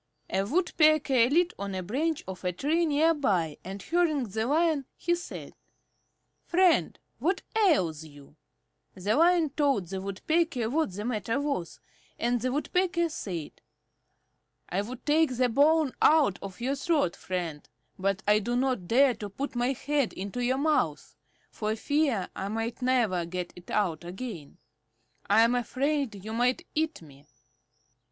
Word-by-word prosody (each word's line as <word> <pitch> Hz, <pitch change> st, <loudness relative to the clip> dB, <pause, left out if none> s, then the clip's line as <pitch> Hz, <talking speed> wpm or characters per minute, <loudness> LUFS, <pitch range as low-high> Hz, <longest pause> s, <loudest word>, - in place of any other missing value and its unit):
A 190 Hz, -, +1 dB
Woodpecker 305 Hz, -, +3 dB
lit 345 Hz, +4 st, +2 dB
on 200 Hz, -1 st, -4 dB
a 185 Hz, -, -3 dB
branch 295 Hz, -, -1 dB
of 190 Hz, -1 st, -7 dB
a 180 Hz, -, 0 dB
tree 315 Hz, -, 0 dB
near 310 Hz, +2 st, +3 dB
by, 185 Hz, -, 0 dB
and 195 Hz, +1 st, -7 dB
hearing 325 Hz, -5 st, +1 dB
the 220 Hz, +1 st, -2 dB
Lion, 310 Hz, -1 st, +2 dB
she 345 Hz, -, 0 dB
said, 345 Hz, 0 st, -6 dB, 0.9 s
"Friend, 365 Hz, -1 st, +3 dB, 0.2 s
what 370 Hz, +3 st, 0 dB
ails 190 Hz, -, +2 dB
you?" 145 Hz, -1 st, -15 dB, 0.6 s
The 200 Hz, +3 st, 0 dB
Lion 335 Hz, -1 st, +4 dB
told 275 Hz, -, +1 dB
the 190 Hz, 0 st, -4 dB
Woodpecker 245 Hz, -, -1 dB
what 315 Hz, -6 st, +1 dB
the 205 Hz, +3 st, -5 dB
matter 230 Hz, +1 st, -1 dB
was, 280 Hz, -, -3 dB, 0.4 s
and 240 Hz, 0 st, 0 dB
the 255 Hz, +1 st, 0 dB
Woodpecker 340 Hz, +4 st, 0 dB
said: 175 Hz, -, -6 dB, 1.1 s
"I 190 Hz, -, 0 dB
would 240 Hz, +5 st, -8 dB
take 300 Hz, -4 st, +2 dB
the 250 Hz, -1 st, +3 dB
bone 295 Hz, +3 st, +3 dB
out 300 Hz, -, +4 dB
of 195 Hz, -2 st, -8 dB
your 255 Hz, +3 st, -1 dB
throat, 285 Hz, -, 0 dB
friend, 175 Hz, -7 st, -5 dB, 0.3 s
but 195 Hz, +1 st, -1 dB
I 210 Hz, +1 st, +5 dB
do 240 Hz, +4 st, -2 dB
not 250 Hz, -7 st, 0 dB
dare 260 Hz, +4 st, +5 dB
to 210 Hz, -3 st, -7 dB
put 270 Hz, +9 st, -5 dB
my 245 Hz, +2 st, +1 dB
head 280 Hz, -1 st, -1 dB
into 200 Hz, +6 st, -4 dB
your 255 Hz, +2 st, +1 dB
mouth, 305 Hz, +2 st, 0 dB, 0.4 s
for 215 Hz, 0 st, -2 dB
fear 275 Hz, -5 st, 0 dB
I 195 Hz, -, -4 dB
might 225 Hz, +4 st, -3 dB
never 240 Hz, -9 st, +2 dB
get 180 Hz, 0 st, -5 dB
it 180 Hz, 0 st, -14 dB
out 180 Hz, -6 st, 0 dB
again. 180 Hz, -, -7 dB, 0.7 s
I 210 Hz, +2 st, +6 dB
am 230 Hz, +1 st, +3 dB
afraid 255 Hz, -3 st, -1 dB
you 220 Hz, -, -5 dB
might 245 Hz, +2 st, +1 dB
eat 315 Hz, -, -1 dB
me." 145 Hz, -1 st, -17 dB
245 Hz, 155 wpm, -28 LUFS, 195-300 Hz, 1.1 s, I